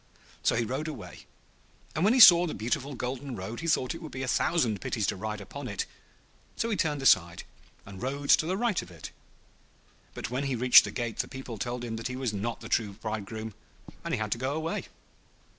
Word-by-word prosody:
So - - +2
he 115 0 +1
rode 135 +7 -3
away, 155 - -9 0.7
and 155 - -1
when 215 +5 +4
he - - +3
saw 175 -5 +10
the - - -4
beautiful 130 +5 -2
golden 130 +2 -4
road 105 +4 -6
he 165 - -4
thought 130 -2 +1
it 165 - -9
would 155 - -8
be 130 - -5
a - - -3
thousand 120 - +1
pities 110 - -1
to - - 0
ride 105 +2 -4
upon 100 -2 -8
it; - - -3 0.7
so 230 - -1
he - - +1
turned 150 -6 -1
aside, 85 -9 +4 0.4
and 100 -1 -10
rode 140 +2 -4
to 160 - +5
the 185 +2 0
right 230 -4 +1
of - - -12
it. 85 -4 -10 1.0
But - - -5
when 130 +3 -1
he 135 -2 -1
reached 125 +1 +7
the - - -5
gate 120 -3 -4
the - - 0
people 130 -5 -8
told 120 +2 -3
him 115 -1 -4
that 115 - -4
he 125 - -5
was 130 -4 -2
not 115 +4 -3
the - - -7
true 105 -3 0
bridegroom, 110 +1 -5 0.5
and - - -4
he - - 0
had 110 -1 -3
to 115 - 0
go 130 +3 -1
away. 160 +1 -3
125 Hz, 225 wpm, -28 LUFS, 110-145 Hz, 1.0 s, saw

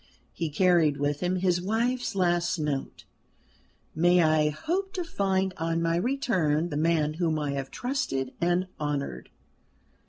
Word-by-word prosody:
He 165 -2 -3
carried 160 -2 +3
with 145 0 -1
him 180 +1 0
his 180 -1 +1
wife's 235 +5 -1
last 175 -1 +1
note: 150 -3 -3 0.9
"May 175 +2 +4
I 155 -1 +3
hope 370 - -3
to 360 - -2
find 190 - 0
on 165 0 -1
my 165 0 +1
return 175 - 0
the 145 - -4
man 155 -1 +1
whom 160 -1 0
I 150 -2 -2
have 135 -1 -4
trusted 190 - -2
and 175 +2 +2
honoured?" 140 - -3
170 Hz, 145 wpm, -27 LUFS, 150-190 Hz, 0.9 s, May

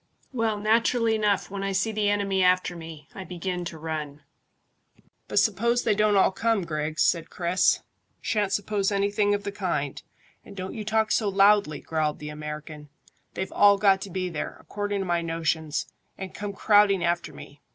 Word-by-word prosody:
"Well, 225 -3 0
naturally 230 +2 +2
enough 210 -3 0
when 200 -1 -4
I 195 0 -2
see 195 +4 0
the 210 -1 0
enemy 200 -2 +1
after 180 -1 +2
me 160 -3 -10
I 190 - -7
begin 180 0 -4
to 170 - -6
run." 150 -2 -5 1.0
"But - - -4
suppose 230 +4 +2
they 220 - +3
don't 210 0 +2
all 190 - +4
come, 225 0 0
Griggs?" 155 0 -1
said 165 -2 +1
Chris. 180 +1 +1 0.4
"Shan't 210 -3 -1
suppose 205 0 0
anything 205 +1 +1
of 205 - -5
the 200 - -3
kind, 175 -9 -3 0.4
and - - -13
don't 185 -1 -5
you 220 - -5
talk 220 +1 +1
so 210 -3 +2
loudly," 195 -5 +3
growled 155 -2 -1
the 150 - -7
American. 150 0 -8 0.5
"They've 190 - -4
all 205 0 +6
got 195 -1 +4
to 195 - -6
be 185 0 -2
there, 160 -4 -5
according 205 -1 -3
to - - -3
my 175 -1 0
notions, 160 -2 -1 0.3
and 190 -1 -7
come 205 -1 -5
crowding 205 -2 +4
after 170 -2 -1
me. 145 0 -13
195 Hz, 180 wpm, -26 LUFS, 165-205 Hz, 1.0 s, all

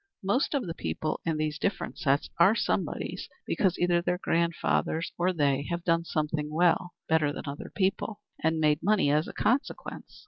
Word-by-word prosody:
Most 245 +10 +1
of 270 - 0
the 165 - -4
people 120 - -3
in 160 -2 +1
these 155 -1 -2
different 200 - -2
sets 140 -1 +2
are 190 +6 +6
somebodies - - -2 0.2
because 185 -3 +1
either 175 -1 +2
their 180 +1 0
grandfathers 170 -1 0
or 180 +2 +1
they 140 -4 +1
have 170 0 -2
done 165 -1 +2
something 150 -1 -1
well 175 +2 +2
better 160 -2 +3
than - - -6
other 140 0 -6
people, 195 +2 0 0.2
and 160 0 +2
made 150 -1 +3
money 200 -8 +3
as 150 +2 +2
a - - -6
consequence. 250 +6 -2
165 Hz, 175 wpm, -28 LUFS, 150-180 Hz, 0.2 s, are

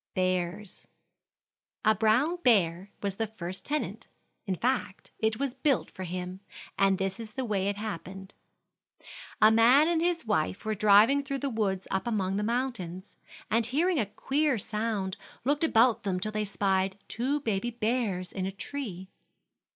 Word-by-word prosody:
BEARS. 185 +2 -2 1.0
A 215 - +6
brown 235 +11 +2
bear 195 - +2
was 200 -1 -2
the 225 - -1
first 185 -3 -6
tenant; 300 +1 -3 0.4
in 190 - 0
fact, 210 -3 -2
it 220 0 +1
was 275 -2 -2
built 275 0 0
for 190 - -7
him, 180 +1 -5 0.4
and 195 -1 +3
this 195 +2 -2
is 220 -2 -8
the 260 +2 -3
way 200 -4 0
it 200 0 -1
happened: 195 -2 -6 1.1
A 215 - +8
man 245 +7 +6
and 335 -1 +1
his 340 -3 0
wife 205 -1 -1
were 215 - 0
driving 215 +7 +5
through 275 0 -3
the 275 0 -2
woods 195 -4 -1
up 190 +5 -1
among 195 -4 0
the - - 0
mountains, 215 -6 -3 0.4
and 225 +1 +2
hearing 325 +7 +1
a 215 - 0
queer 275 +6 0
sound 210 -2 -2 0.3
looked 285 +3 +1
about 240 -6 +4
them 190 -3 -1
till 215 +3 -3
they 215 0 -1
spied 195 -1 0
two 265 +6 -1
baby 220 -2 -1
bears 220 -6 -1
in 190 -1 -3
a - - -3
tree. 195 -3 -5
215 Hz, 160 wpm, -29 LUFS, 190-250 Hz, 1.1 s, A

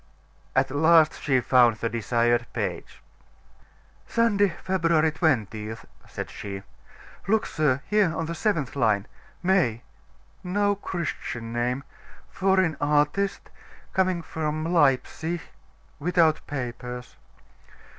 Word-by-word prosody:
At - - +2
last 160 +2 +4
she 130 -3 +2
found 120 -2 +5
the 115 - -2
desired 120 +1 +1
page. - - -4 1.0
"Sunday, 205 -4 +3
February 165 -4 +2
20th," 110 - -1 0.2
said - - -6
she. 100 -1 -7 0.6
"Look, 220 +2 +2
sir: 145 -3 0
here 210 -5 +2
on 165 - -1
the 165 - -4
seventh 165 - -1
line 110 -6 +2 0.4
May 160 - +2 0.6
no 205 +2 +1
Christian 155 - -5
name 125 +3 -1 0.5
foreign 190 -4 +2
artist 150 +7 +1 0.4
coming 185 -2 +1
from 155 -1 -3
Leipsic 160 +3 +1 0.6
without 165 0 +3
papers." 125 -2 -6
150 Hz, 100 wpm, -25 LUFS, 120-180 Hz, 1.0 s, found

